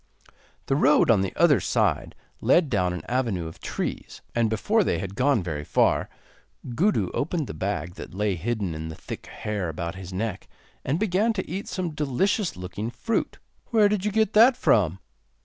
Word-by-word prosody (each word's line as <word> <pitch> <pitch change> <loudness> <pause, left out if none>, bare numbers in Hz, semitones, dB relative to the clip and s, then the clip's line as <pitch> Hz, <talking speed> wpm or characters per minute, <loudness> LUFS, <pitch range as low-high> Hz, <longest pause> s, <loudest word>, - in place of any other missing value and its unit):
The 135 - +1
road 145 -3 +5
on 105 -4 +4
the 95 - -1
other 155 -8 +5
side - - 0 0.2
led 160 -6 +3
down 90 -5 +1
an 90 -3 -6
avenue 115 -9 -1
of 80 - -10
trees, - - -5
and 115 -2 +2
before 205 - +2
they - - 0
had 95 -1 -5
gone 130 -2 +2
very 75 -4 -4
far - - +2 0.6
Gudu 200 - +1
opened 155 +1 -1
the - - -7
bag 90 +1 -3
that - - -9
lay 105 0 +1
hidden 100 0 -2
in 80 +1 -5
the 80 - -7
thick - - -8
hair 105 -5 -3
about 85 +1 -4
his 95 -1 -9
neck, 100 +2 -3 0.4
and 140 +5 0
began 215 +2 +2
to 190 - -4
eat 190 +4 -5
some 180 -4 -3
delicious 155 - 0
looking 95 +5 -5
fruit. 125 - -2 0.3
'Where 220 -3 +4
did 205 -2 0
you 210 - 0
get 220 0 +1
that 240 +4 +6
from? 95 -5 +3
115 Hz, 185 wpm, -25 LUFS, -, 0.6 s, that